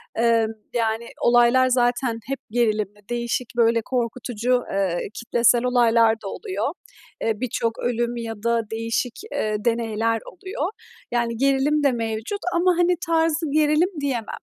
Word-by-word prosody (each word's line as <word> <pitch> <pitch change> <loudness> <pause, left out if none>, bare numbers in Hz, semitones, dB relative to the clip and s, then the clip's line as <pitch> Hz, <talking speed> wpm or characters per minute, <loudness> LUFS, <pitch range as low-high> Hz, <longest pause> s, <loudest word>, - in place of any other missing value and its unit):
Emm, 230 -1 +3 0.2
yani, 230 0 -1
olaylar 240 +2 +5
zaten 245 -1 +1
hep 275 0 -3
gerilimli, 215 -3 -1
değişik, 240 0 -2
böyle, 230 -1 +4
korkutucu, 245 0 -1
eee, 190 -3 0
kitlesel 235 +1 +2
olaylar 230 -2 +4
da - - -5
oluyor. 385 - -3 0.5
Eee, 225 - +2
birçok 230 -2 -1
ölüm 240 0 -1
ya 230 -1 -4
da 235 0 +2
değişik, 230 +2 -2 0.2
eee, 215 0 -1
deneyler 230 -1 0
oluyor. 375 -2 -4 0.4
Yani 235 -1 0
gerilim 275 +3 +2
de 280 - +4
mevcut 225 - -3 0.2
ama, 360 +1 +4
hani, 355 0 +3
tarzı 325 -2 +1
gerilim 305 +3 +3
diyemem. 250 -6 -3
235 Hz, 130 wpm, -23 LUFS, 225-265 Hz, 0.5 s, olaylar